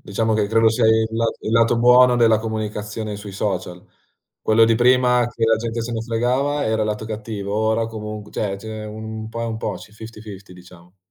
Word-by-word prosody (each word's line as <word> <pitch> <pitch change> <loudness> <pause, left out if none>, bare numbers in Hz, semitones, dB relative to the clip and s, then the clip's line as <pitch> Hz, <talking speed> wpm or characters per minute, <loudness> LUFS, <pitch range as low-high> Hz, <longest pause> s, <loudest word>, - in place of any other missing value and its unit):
Diciamo 110 +2 -1
che 105 -1 +1
credo 110 +1 +3
sia 115 0 +2
il 110 0 +3
lat 115 0 -1
il 110 - -4
lato 115 +1 +3
buono 125 +1 +6
della 115 -2 +4
comunicazione 110 -1 -4
sui 100 -1 -9
social. 95 -3 -4 0.6
Quello 110 +1 +4
di 115 0 +3
prima, 125 0 +3
che 115 -1 -2
la 115 0 +3
gente 115 0 -3
se 120 +1 -5
ne 115 - -2
fregava, 125 +5 0
era 110 0 0
il 105 - -1
lato 105 +1 -3
cattivo. 105 -2 -5
Ora 110 +1 +1
comunque 105 -1 -7
cioè, 100 -2 -2
ce 110 +3 -10
n'è 110 0 -6
un 110 +1 -7
po' 115 +1 -5
è - - -1
un 115 -1 -3
po', - - -3
c'è 105 - -12
fifty/fifty 105 -3 -11
diciamo. 90 0 -17
110 Hz, 210 wpm, -21 LUFS, 105-115 Hz, 0.6 s, buono